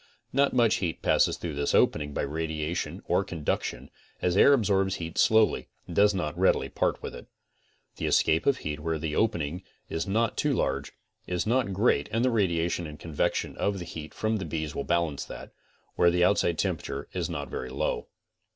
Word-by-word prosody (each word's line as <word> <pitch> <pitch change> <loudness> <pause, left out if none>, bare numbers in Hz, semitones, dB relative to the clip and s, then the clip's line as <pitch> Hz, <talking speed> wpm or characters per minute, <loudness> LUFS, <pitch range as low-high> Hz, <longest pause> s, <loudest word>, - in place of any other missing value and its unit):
Not 140 +1 +3
much 120 -3 +3
heat 85 -4 -3
passes - - +3
through 85 -3 -5
this 70 0 0
opening 75 -1 +2
by - - -2
radia 80 +2 -3
tion - - -4
or - - +2
conduction, 80 -4 -3 0.3
as 90 0 +1
air 120 - +7
absorbs 100 -7 +2
heat 85 0 -5
slowly 110 -1 +4 0.2
and 85 - -8
does 105 0 +5
not 75 -5 -2
readily - - +2
part - - -1
with - - -5
it. - - -10 0.7
The - - -2
escape 80 +1 +3
of 140 -2 +4
heat 75 - -4
where 80 +1 -2
the 75 -1 -3
opening 90 -6 0 0.3
is 80 +4 -2
not 110 +3 +1
too 150 -1 +1
large, 70 - -1 0.4
is 90 -1 -1
not 120 -2 +1
great 95 -7 +2
and 115 +3 +1
the 130 - +3
radiation 85 -5 0
and 75 0 -10
convection 80 -3 -1
of 100 -1 0
heat 80 -3 -8
from 110 0 0
the 95 - -4
bees 80 -1 -3
will - - -3
balance 85 -5 0
that, - - -9 0.5
where 85 - +5
outside 85 -4 +2
temperature - - -2
is - - -2
not 70 -2 -4
very 65 - -4
low. 65 - -2
85 Hz, 190 wpm, -28 LUFS, 75-105 Hz, 0.7 s, air